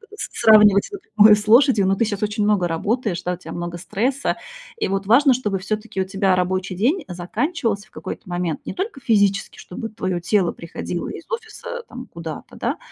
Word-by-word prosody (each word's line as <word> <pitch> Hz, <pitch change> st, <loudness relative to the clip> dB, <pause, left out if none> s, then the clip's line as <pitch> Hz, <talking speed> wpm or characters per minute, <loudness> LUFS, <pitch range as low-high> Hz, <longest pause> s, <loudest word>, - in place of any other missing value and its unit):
сравнивать 210 Hz, -, +5 dB
напрямую 215 Hz, -, +5 dB
с 210 Hz, 0 st, -6 dB
лошадью, 230 Hz, -4 st, +5 dB
но 195 Hz, -, +3 dB
ты 230 Hz, -, +1 dB
сейчас 205 Hz, -2 st, -3 dB
очень 210 Hz, 0 st, -1 dB
много 200 Hz, -4 st, +2 dB
работаешь, 190 Hz, +2 st, -1 dB
да, 180 Hz, -, -1 dB
у -, -, -6 dB
тебя -, -, -10 dB
много 175 Hz, 0 st, -5 dB
стресса. 245 Hz, +9 st, -1 dB, 0.4 s
И -, -, -1 dB
вот 195 Hz, 0 st, -2 dB
важно, 265 Hz, +4 st, +6 dB
чтобы 210 Hz, -6 st, -1 dB
всё-таки 210 Hz, 0 st, -3 dB
у -, -, -1 dB
тебя 195 Hz, -1 st, +1 dB
рабочий 185 Hz, +1 st, -1 dB
день 275 Hz, -, +1 dB
заканчивался 210 Hz, -, -2 dB
в -, -, -32 dB
какой-то 185 Hz, -, -8 dB
момент 175 Hz, -3 st, -2 dB
не -, -, -4 dB
только 380 Hz, -6 st, -4 dB
физически, 200 Hz, -3 st, +1 dB
чтобы 225 Hz, +5 st, -7 dB
твое 185 Hz, -4 st, -3 dB
тело 185 Hz, -1 st, +2 dB
приходило 170 Hz, 0 st, -5 dB
из -, -, -8 dB
офиса 465 Hz, +1 st, -6 dB
там 250 Hz, +1 st, -9 dB
куда-то, 165 Hz, -2 st, -8 dB
да? -, -, -2 dB
205 Hz, 185 wpm, -21 LUFS, 185-235 Hz, 0.4 s, важно